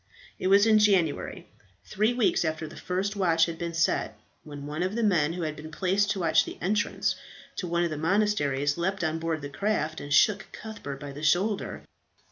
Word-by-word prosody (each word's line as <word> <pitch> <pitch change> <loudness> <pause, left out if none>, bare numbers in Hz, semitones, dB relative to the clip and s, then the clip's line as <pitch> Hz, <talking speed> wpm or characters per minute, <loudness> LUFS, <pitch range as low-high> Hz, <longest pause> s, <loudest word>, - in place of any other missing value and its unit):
It 185 - -1
was 200 +2 +6
in 220 -1 +5
January, 190 -8 +1 0.4
three 215 +4 +1
weeks 240 -7 +2
after 160 0 -2
the - - -11
first 190 +3 -2
watch 165 -4 +3
had 165 -1 -6
been 170 -1 -4
set, 110 -9 0 0.2
when 145 -2 -9
one 150 +3 -4
of 185 +3 -1
the 235 - 0
men 165 -7 +2
who 175 -1 -4
had 155 -1 -3
been 155 +1 -9
placed 195 +5 +1
to 195 - -1
watch 160 -2 +4
the - - -8
entrance 205 +3 0 0.4
to 180 - -3
one 170 0 +1
of 170 - -1
the 155 - -3
monasteries, 160 -6 +1
leapt 190 +1 -1
on 160 0 -1
board 160 -2 -2
the - - -3
craft 160 -1 -1
and 145 - -8
shook 205 +7 +4
Cuthbert 175 -11 -7
by 145 -1 -7
the 145 +2 -9
shoulder. 185 +7 0
170 Hz, 205 wpm, -27 LUFS, 155-200 Hz, 0.4 s, was